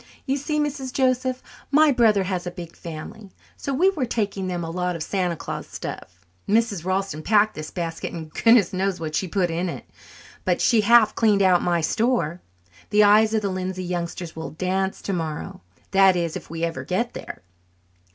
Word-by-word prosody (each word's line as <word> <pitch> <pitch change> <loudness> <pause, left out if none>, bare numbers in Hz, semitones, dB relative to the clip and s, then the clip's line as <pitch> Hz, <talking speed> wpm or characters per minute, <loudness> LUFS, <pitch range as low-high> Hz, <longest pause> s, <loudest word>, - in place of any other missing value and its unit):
"You 270 - 0
see, 295 +2 -2
Mrs. 285 -3 -2
Joseph, 255 -1 0 0.3
my 300 +1 +5
brother 220 -6 +4
has 185 -1 -3
a - - 0
big 170 -1 -9
family, 170 +6 -9 0.3
so 280 - -4
we 355 +9 +3
are 290 - -1
taking 205 -5 -2
them 175 -2 -3
a 165 - -4
lot 180 0 -2
of 165 - -4
Santa 180 -1 -1
Claus - - -6
stuff. - - -8 0.2
Mrs. 215 -5 +2
Ralston 185 -3 -2
packed 215 +4 +3
this 155 0 -7
basket, 165 -2 -4
and 160 -2 -7
goodness 230 -6 +4
knows 190 0 -1
what 155 -2 -4
she 185 - 0
put 180 -2 0
in 175 +2 -1
it, - - -7 0.6
but - - +1
she 230 -3 +4
half 225 0 +5
cleaned 210 -3 +3
out 180 -2 +4
my 175 -1 +1
store. 180 -3 0 0.5
The 210 0 +5
eyes 215 +2 +5
of 215 - 0
the 200 - 0
Lindsay 185 0 -3
youngsters 175 -1 -4
will 160 0 -5
dance 190 +3 -2
tomorrow 180 +1 -4 0.3
that 195 -1 +5
is, 170 -2 -1
if - - -7
we 165 +1 -5
ever 165 -1 -2
get 235 +7 -1
there." - - -8
190 Hz, 190 wpm, -23 LUFS, 175-225 Hz, 0.6 s, my